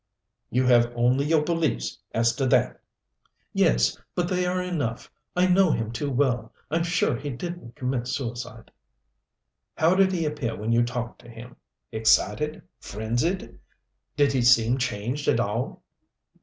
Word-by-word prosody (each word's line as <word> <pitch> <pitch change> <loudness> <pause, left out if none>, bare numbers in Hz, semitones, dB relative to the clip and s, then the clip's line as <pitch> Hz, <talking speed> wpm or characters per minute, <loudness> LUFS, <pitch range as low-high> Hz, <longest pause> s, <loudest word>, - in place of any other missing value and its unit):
"You 130 +1 +1
have 120 -1 +4
only 125 +4 +2
your 155 0 +3
beliefs 160 - -1
as 115 +1 +1
to 135 - +1
that?" - - +2 0.7
"Yes, - - +2 0.2
but 175 -1 0
they 180 -1 0
are 180 +1 0
enough. 155 -11 -3 0.2
I 180 +1 +4
know 185 0 +4
him 115 -6 -1
too 140 +5 -3
well. 125 -4 0 0.2
I'm 165 +2 +1
sure 170 -6 +1
he 140 +4 -5
didn't 140 -2 -7
commit 125 -1 -2
suicide." 120 -3 -5 1.1
"How 160 +3 +4
did 190 0 +4
he 170 -3 -1
appear 150 -7 -2
when 110 +2 -3
you 115 +1 +4
talked 120 0 -4
to - - -15
him 120 +2 -11 0.4
excited, 110 +6 +1 0.2
frenzied? 120 - -3 0.6
Did 145 -1 +3
he 130 - +2
seem 120 +1 +4
changed 125 +3 -3
at - - +3
all?" 115 +3 -2
125 Hz, 150 wpm, -25 LUFS, 115-155 Hz, 1.1 s, have